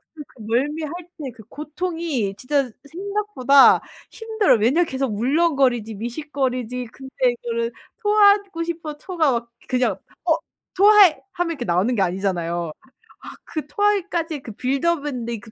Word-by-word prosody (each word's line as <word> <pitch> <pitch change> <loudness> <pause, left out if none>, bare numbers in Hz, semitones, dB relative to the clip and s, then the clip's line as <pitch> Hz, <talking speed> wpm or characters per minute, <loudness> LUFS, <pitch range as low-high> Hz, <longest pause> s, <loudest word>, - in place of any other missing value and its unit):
그 300 - -8
그 235 - -17
멀미할 290 +8 -1 0.2
때 275 -5 -6
그 220 - -13
고통이 300 - -3
진짜 270 +2 0 0.2
생각보다 385 -8 +4 0.3
힘들어요. 440 - +1
왜냐하면 285 +11 +3
계속 265 -6 -2
울렁거리지 260 -4 +2
미식거리지 250 0 -3
근데 265 0 -12 0.2
이거를 235 0 -3 0.3
토하고 405 -4 +4
싶어도 325 -3 -5
토가 320 -4 0
막 235 -1 -3 0.2
그냥 255 -1 +1 0.3
"어 - - +4 0.4
토해." 405 -3 +6
하면 350 -2 -1
이렇게 265 -7 -4
나오는 185 +8 +1
게 200 - +1
아니잖아요. 175 -3 -1 0.5
아 - - -8
그 310 -3 -5
토하기까지의 340 -5 0
그 225 - -9
빌드업 280 +6 0
있는데 235 -4 -4
그 220 0 -15
275 Hz, 330 characters per minute, -22 LUFS, 235-335 Hz, 0.5 s, 토해